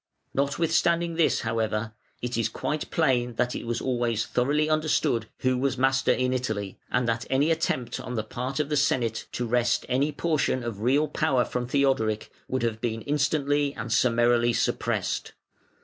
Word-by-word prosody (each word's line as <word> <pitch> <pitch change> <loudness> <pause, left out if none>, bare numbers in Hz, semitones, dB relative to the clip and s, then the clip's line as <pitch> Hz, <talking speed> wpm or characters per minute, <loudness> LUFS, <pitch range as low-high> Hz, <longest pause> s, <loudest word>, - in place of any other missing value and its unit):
Notwithstanding 165 +4 +1
this, 165 -1 +2
however, 110 -1 -1 0.3
it 125 0 -2
is 115 - +1
quite 155 0 -3
plain 125 -6 +1
that 120 +2 0
it - - -5
was 120 0 -1
always 120 -4 0
thoroughly 145 +5 +1
understood 155 -6 +1
who 130 -1 +1
was 135 0 0
master 135 +1 +3
in 130 0 +1
Italy, 110 -6 -3
and 125 -1 +1
that 115 0 -1
any 140 +5 +2
attempt 130 -7 -1
on 125 - -5
the 110 - -1
part 125 +6 -4
of 150 -1 0
the 150 - 0
Senate 120 -5 0
to 120 - -2
wrest 120 +1 +1
any 140 +4 +1
portion 150 -5 0
of 115 -4 -5
real 140 +6 +3
power 140 -4 +1
from 125 -1 -3
Theodoric 130 -6 +1 0.2
would 130 -1 -2
have 110 -1 -1
been 115 -2 -2
instantly 145 -1 +1
and 115 0 -3
summarily 120 -1 +3
suppressed. - - -1
125 Hz, 165 wpm, -26 LUFS, 115-145 Hz, 0.3 s, master